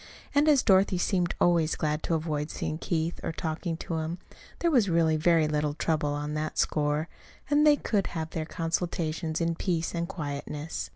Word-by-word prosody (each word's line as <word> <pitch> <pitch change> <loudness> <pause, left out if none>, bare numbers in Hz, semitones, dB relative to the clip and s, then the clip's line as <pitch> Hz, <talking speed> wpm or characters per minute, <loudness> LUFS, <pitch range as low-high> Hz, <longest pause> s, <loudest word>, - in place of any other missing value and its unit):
And 290 +2 +4
as 285 -4 +5
Dorothy 190 -1 +4
seemed 175 -1 0
always 170 -3 +3
glad 150 0 -1
to 165 - 0
avoid 155 -1 -2
seeing 155 +1 -4
Keith 165 -1 -2
or - - -2
talking 160 +1 -3
to 165 0 -4
him, 160 +2 -3 0.4
there 340 - +1
was 235 -9 +4
really 165 -2 +3
very 160 0 +3
little 150 -1 -1
trouble 155 -2 0
on 150 +1 -3
that 155 0 -3
score; 150 +1 +1 0.4
and 295 +1 +5
they 295 - +7
could 205 -8 0
have 160 -1 -4
their 160 -1 -3
consultations 165 -1 -2
in 170 0 +1
peace 165 -1 -1
and 170 0 -2
quietness. 150 -1 -5
165 Hz, 180 wpm, -28 LUFS, 155-175 Hz, 0.4 s, they